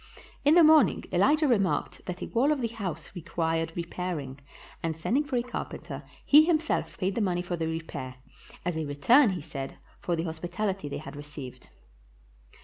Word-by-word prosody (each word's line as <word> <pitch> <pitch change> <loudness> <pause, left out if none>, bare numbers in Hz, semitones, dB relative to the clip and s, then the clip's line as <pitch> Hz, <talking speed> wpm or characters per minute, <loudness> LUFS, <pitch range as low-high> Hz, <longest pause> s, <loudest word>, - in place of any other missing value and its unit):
In 295 +3 +5
the 345 - +8
morn 310 0 +7
ing - - -7
Elijah 305 0 +4
remarked 200 -7 +1
that 180 0 -4
a - - -5
wall 265 +6 +2
of 300 - +1
the 235 -2 -1
house 190 -8 -5
required 165 -2 -1
repairing, 170 -6 -4 0.4
and 160 -1 -2
sending 245 - +1
for 290 -3 -4
a 240 - +1
carpenter, 245 - -6 0.2
he 300 +2 +8
himself 325 -1 0
paid 190 +1 0
the 230 - -1
money 180 -3 0
for 175 0 -3
the 165 -1 -2
repair, 155 -5 -5 0.5
as 180 -2 -1
a 160 - -2
return, 220 - +5
he 185 -4 -3
said, 140 -3 -6 0.2
for 175 - -1
the 165 - -2
hospitaHty 175 +2 -3
they - - -4
had 155 0 -8
received. 145 -3 -9
175 Hz, 180 wpm, -28 LUFS, 160-235 Hz, 0.5 s, the